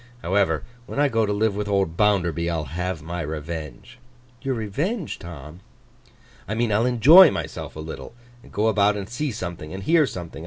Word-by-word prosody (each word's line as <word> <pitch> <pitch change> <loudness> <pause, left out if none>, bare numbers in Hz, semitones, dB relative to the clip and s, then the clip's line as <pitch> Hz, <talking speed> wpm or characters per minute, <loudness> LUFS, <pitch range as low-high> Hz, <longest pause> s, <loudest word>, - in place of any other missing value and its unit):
However, 85 -3 +1 0.2
when - - -7
I 145 -1 +4
go 115 -3 +1
to - - -1
live 105 0 +1
with 105 0 -3
old 95 -5 0
Bounderby, 85 -5 +1
I'll 80 -2 -1
have 85 +2 -4
my 85 +2 -4
revenge.' 75 - -6 0.4
'Your 135 -2 -1
revenge, 150 - -3
Tom?' 85 -1 -10 0.9
'I 105 - -2
mean, 115 -1 0
I'll 115 +4 +2
enjoy 150 - +8
myself - - -5
a - - -8
little, 80 +8 -8 0.3
and - - -17
go 105 - 0
about 105 -1 +3
and 100 -1 -5
see 125 +5 -3
something, 85 -7 -6
and 95 +1 -6
hear 160 - +4
something. 90 -7 -7
100 Hz, 185 wpm, -23 LUFS, 85-115 Hz, 0.9 s, enjoy